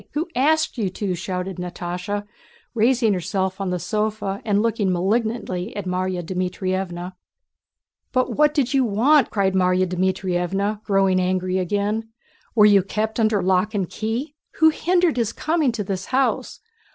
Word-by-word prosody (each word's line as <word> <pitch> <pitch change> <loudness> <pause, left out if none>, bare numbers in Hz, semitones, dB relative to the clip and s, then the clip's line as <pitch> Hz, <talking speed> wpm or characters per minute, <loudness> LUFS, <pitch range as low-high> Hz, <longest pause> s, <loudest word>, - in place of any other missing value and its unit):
Who 320 +4 -2
asked 310 +1 +2
you 200 -4 0
to?" 190 0 -3
shouted 180 +1 -4
Natásha, 180 +3 -4 0.5
raising 230 -1 +3
herself 190 +1 -2
on 195 - -1
the 180 - -1
sofa 210 +2 -2
and 205 -2 +1
looking 220 -4 +1
malignantly 200 +1 -1
at 205 - -4
Márya 185 0 -2
Dmítrievna. 185 0 -3 1.0
"But 255 -1 0
what 300 0 +3
did 265 -3 +1
you 270 -1 +4
want?" 245 +5 +3
cried 195 -2 +1
Márya 185 0 +3
Dmítrievna, 185 +2 -1
growing 195 -2 +3
angry 185 0 0
again. 205 +4 -1 0.5
"Were 210 -2 +7
you 205 -2 +6
kept 215 +4 -3
under 215 -4 +2
lock 190 +3 +1
and 195 -3 0
key? 230 - -3 0.2
Who 320 0 +6
hindered 350 -1 +1
his 230 -2 0
coming 310 0 0
to 220 -3 -3
the 190 -1 -3
house? 265 +1 0
200 Hz, 150 wpm, -22 LUFS, 185-230 Hz, 1.0 s, Were